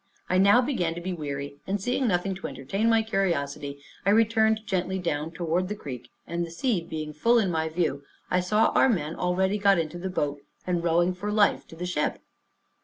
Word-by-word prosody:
I 185 - +4
now 200 +5 +6
began 180 - -1
to - - -4
be 185 +1 -3
weary, 140 -3 -5
and 200 +2 0
seeing 250 +5 0
nothing 190 -1 +1
to 190 - -5
entertain 195 - -1
my 225 -1 +4
curiosity, 140 -9 -2 0.2
I 200 - +2
returned 220 0 +3
gently 190 -1 -1
down 160 -4 -2
toward 170 +2 -1
the 210 - -3
creek; 125 - -8 0.2
and 170 +1 -2
the 170 - -5
sea 195 +3 0
being 155 -2 -5
full 230 +11 +3
in 200 -6 +2
my 160 -1 0
view, 160 -4 -1 0.3
I 180 - +3
saw 210 +5 +3
our 265 - +5
men 160 -8 -1
already 190 +3 0
got 200 -1 +4
into 165 +1 -2
the 190 +2 -3
boat, 145 -5 -2 0.2
and 175 -2 -1
rowing 175 +2 +2
for 205 +3 -4
life 210 -1 +2
to - - -12
the 175 +2 -5
ship. 150 -4 -1
180 Hz, 205 wpm, -26 LUFS, 160-205 Hz, 0.3 s, now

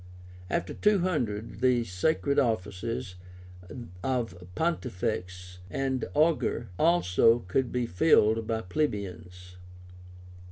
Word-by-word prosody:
After 90 - -1
200 155 - 0
the 125 -2 +3
sacred 140 - +1
offices 110 -4 -2 0.9
of 125 -8 -1 0.2
PONTIFEX 95 - -3
and 130 +3 -1
AUGUR 150 -6 +1
also 120 - +4
could 120 +5 0
be 125 -1 0
filled 110 - +3
by 115 -1 -1
plebeians. 90 - -4
115 Hz, 85 wpm, -28 LUFS, 90-135 Hz, 0.9 s, also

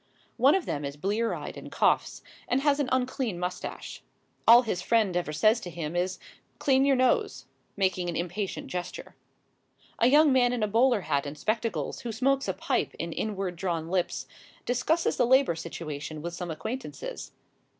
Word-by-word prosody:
One 265 +7 +5
of 385 - 0
them 145 - -3
is 140 0 -5
blear 210 +8 0
eyed - - -7
and - - -9
coughs, - - +1 0.2
and 255 +2 +1
has 290 0 +2
an 275 -3 0
unclean 255 -5 0
moustache. 180 +1 -5 0.5
All 235 +2 +9
his 195 -6 -2
friend 215 -2 +2
ever 175 -3 -1
says 215 +10 +3
to 180 - -7
him 165 -1 -5
is: 180 +1 0 0.4
"Clean 270 -1 +3
your 275 -1 +4
nose," 410 - +1 0.3
making 185 -2 0
an 170 - -3
impatient 180 +3 -3
gesture. 180 -1 -6 0.8
A 235 - +5
young 295 +1 +6
man 245 -1 +4
in 240 -3 -1
a - - +2
bowler 230 +1 +3
hat 145 -4 -1
and 145 +2 -7
spectacles, 220 +6 -2
who 235 - -5
smokes 270 +4 +1
a - - 0
pipe - - -1
in - - -4
inward 195 -4 -3
drawn 170 -2 -3
lips, 180 -1 -1 0.4
discusses 315 +7 +1
the 245 - +3
Labour 260 -7 +4
situation 155 -2 -6
with 170 0 -4
some 175 0 -5
acquaintances. 260 - -6
215 Hz, 175 wpm, -28 LUFS, 175-255 Hz, 0.8 s, All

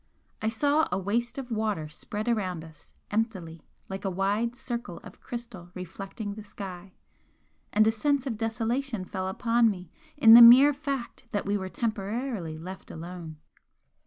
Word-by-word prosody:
I 220 - +1
saw 290 +7 +2
a - - +1
waste 230 +6 -1
of 260 -3 -6
water 215 -8 -1
spread 210 +8 -5
around 185 -8 -1
us 160 -2 -16 0.2
emptily 190 -7 -2 0.3
like 190 0 -6
a 195 - 0
wide 205 +6 0
circle 240 -8 -5
of - - -13
crystal 230 -8 -8
reflecting 195 +3 -6
the 215 +1 -9
sky, 190 -2 -9 0.8
and 215 +1 +4
a 220 - +4
sense 280 +4 0
of 250 -5 -2
desolation 225 0 -2
fell 185 0 -4
upon 230 +4 +2
me 180 -5 -6 0.3
in 225 -6 +8
the 235 - +12
mere 255 +5 +10
fact 270 -3 -5
that 205 - -1
we 200 +1 0
were 190 -2 -3
temporarily 215 -5 -3
left 185 +4 -9
alone. 165 -1 -8
215 Hz, 160 wpm, -28 LUFS, 185-235 Hz, 0.8 s, the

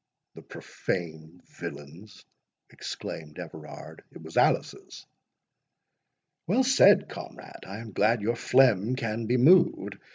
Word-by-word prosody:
"The - - -12
profane 80 0 -6
villains!" 90 +8 -11 0.5
exclaimed 75 -2 -8
Everard, 80 -3 -10
"it - - -13
was - - -11
Alice's." - - 0 1.4
"Well 230 +10 +2
said, 265 +2 +5
comrade—I 100 +2 -10
am 115 -1 -9
glad 110 +2 +1
your 115 +3 0
phlegm 120 -2 +3
can 115 -2 -3
be 125 +2 +2
moved. 170 +9 +3
110 Hz, 105 wpm, -27 LUFS, 85-125 Hz, 1.4 s, said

